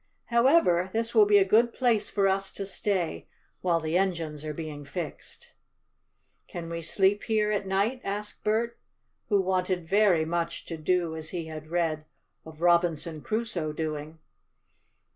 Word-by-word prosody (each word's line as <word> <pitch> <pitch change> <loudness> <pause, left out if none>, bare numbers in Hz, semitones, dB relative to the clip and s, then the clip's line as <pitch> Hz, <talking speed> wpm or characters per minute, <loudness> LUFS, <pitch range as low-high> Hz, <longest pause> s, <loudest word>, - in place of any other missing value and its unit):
However, 235 - +4
this 230 +2 -1
will 215 -3 +6
be 205 0 +6
a 195 - +5
good 230 +4 +3
place 235 -5 +2
for 200 -2 +2
us 195 0 0
to 195 - -4
stay 190 - -2 0.3
while 170 -2 +2
the 160 +2 0
engines 165 -6 -2
are 155 - -3
being 150 -1 -6
fixed." 150 +2 -7 1.0
"Can 170 -1 -7
we 170 0 -3
sleep 190 +5 +2
here 215 -1 +1
at 205 -2 -1
night?" 205 +7 0
asked 210 +1 -4
Bert, 225 +2 0 0.5
who 205 -2 +4
wanted 185 -2 0
very 190 -4 +4
much 170 +1 -2
to 165 - -5
do 170 +1 0
as 160 -1 -6
he 170 -3 -4
had 155 -1 -8
read 160 -2 -1 0.4
of 160 0 -12
Robinson 170 -2 +2
Crusoe 215 -8 -2
doing. 155 0 -4
180 Hz, 155 wpm, -27 LUFS, 160-205 Hz, 1.0 s, will